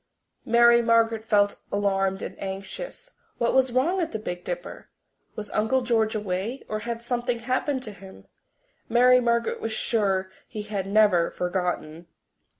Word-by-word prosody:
Mary 235 +1 +6
Margaret 230 -1 +2
felt 205 -2 +2
alarmed 195 -1 0
and - - -6
anxious. 195 - -7 0.3
What 235 - +1
was 265 -1 +3
wrong 325 +10 +1
at 330 - -2
the - - -2
Big 180 -5 -6
Dipper? - - -6 0.5
Was 210 -1 -7
Uncle 220 +5 +1
George 225 -3 +1
away? 210 +5 -3
Or 215 - -3
had 235 +1 -5
something 240 0 -2
happened 260 +2 -1
to 215 - -7
him? 190 -1 -14 0.6
Mary 250 +2 +6
Margaret 235 -1 0
was 225 - -3
sure 195 -5 0 0.2
he 210 - -6
had 205 -2 -4
never 200 -4 +4
forgotten! 175 -3 -3
220 Hz, 150 wpm, -25 LUFS, 195-240 Hz, 0.6 s, Mary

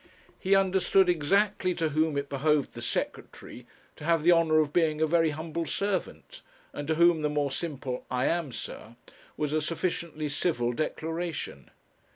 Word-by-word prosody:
He 195 +1 +3
understood 190 -1 +3
exactly 185 +3 +1
to 165 -2 0
whom 155 0 +1
it 140 0 -2
behoved 145 +1 +1
the - - -8
secretary 120 -1 -5 0.3
'to - - -11
have 165 -1 +2
the 175 - +6
honour 165 -2 +4
of 150 -2 +2
being 160 -3 +2
a 160 - +3
very 165 0 +3
humble 160 +2 -4
servant,' 205 - -3 0.3
and 145 0 -6
to 160 - +1
whom 170 -1 +4
the 150 - +1
more 145 -2 0
simple 135 -4 -4
'I 125 +1 0
am, 165 -5 0
sir,' 115 -1 -8 0.4
was 150 -1 -1
a 155 - +1
sufficiently 165 -1 -2
civil 140 -5 0
declaration. 160 - -4
155 Hz, 165 wpm, -28 LUFS, 145-170 Hz, 0.4 s, the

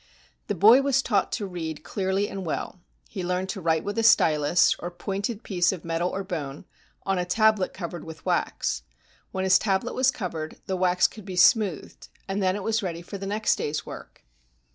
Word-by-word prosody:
The - - -1
boy 225 +7 +7
was 270 -1 +2
taught 200 -5 +1
to 210 - -2
read 165 -5 -5
clearly 195 +1 -1
and 195 -1 -6
well. 175 +2 -4 0.3
He 190 -4 -6
learned 180 +1 -1
to 195 - -4
write 160 -1 +1
with 205 +3 -3
a - - +1
stylus, 160 -6 +4
or 175 - -4
pointed 200 +5 -4
piece 180 -3 +1
of 180 -4 -7
metal 165 +2 0
or 195 +1 -4
bone, 150 -7 -5 0.4
on 195 -1 0
a - - +1
tablet 215 +1 +2
covered 175 -2 -6
with 160 -2 -11
wax. - - -1 0.5
When 190 - -2
his 190 -1 +5
tablet 200 +3 0
was 260 0 +3
covered, 170 -10 -5
the 190 - -2
wax 180 0 +3
could 215 - -2
be 190 -2 -6
smoothed, 200 -1 +2 0.2
and 195 +1 -2
then 185 0 +2
it 205 - -5
was 225 +2 0
ready 170 -3 -4
for 200 +3 -8
the 195 - -5
next 210 +2 +1
day's 150 +1 -3
work. - - -11
190 Hz, 200 wpm, -26 LUFS, 175-205 Hz, 0.5 s, boy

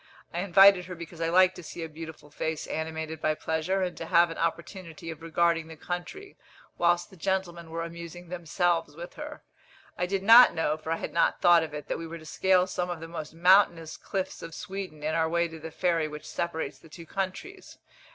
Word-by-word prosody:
I 170 - -2
invited 195 0 +6
her 180 0 -7
because 170 0 -9
I 165 - +1
like 185 +1 +5
to 180 - -10
see 170 0 -7
a - - -4
beautiful 160 -1 -10
face 160 +1 -3
animated 160 0 -4
by 155 0 +1
pleasure, 160 +5 -1
and 180 - -3
to 165 - -6
have 170 -1 +4
an 165 - -7
opportunity 165 -1 -4
of 160 0 -10
regarding 165 0 +1
the 160 - -10
country, 180 - -6 0.4
whilst 175 +2 +2
the - - -14
gentlemen 175 -2 -2
were 165 +1 -3
amusing 170 +1 -9
themselves 170 -2 0
with 170 +2 -8
her. 300 0 -8 0.6
I 180 - +1
did 195 +1 -2
not 230 +2 +9
know, 155 -2 +1
for 155 +1 -6
I 165 - +1
had - - -6
not 170 - +2
thought 175 -1 +6
of 155 -2 -5
it, 150 -1 -7
that - - -3
we 165 - -6
were 165 +1 -7
to 160 - -13
scale 185 +3 +3
some 180 -1 -3
of 175 -2 -4
the 165 - -8
most 160 -2 -7
mountainous 175 -2 +4
cliffs 190 -2 -4
of 165 -1 -8
Sweden 185 -6 -7
in 155 +1 -1
our 160 0 +1
way 170 +1 +1
to 160 -1 -10
the 160 +1 -7
ferry 165 -1 0
which 150 0 -9
separates 160 -4 -3
the 165 - -17
two 165 +2 -11
countries. 195 - -5
170 Hz, 220 wpm, -28 LUFS, 160-180 Hz, 0.6 s, not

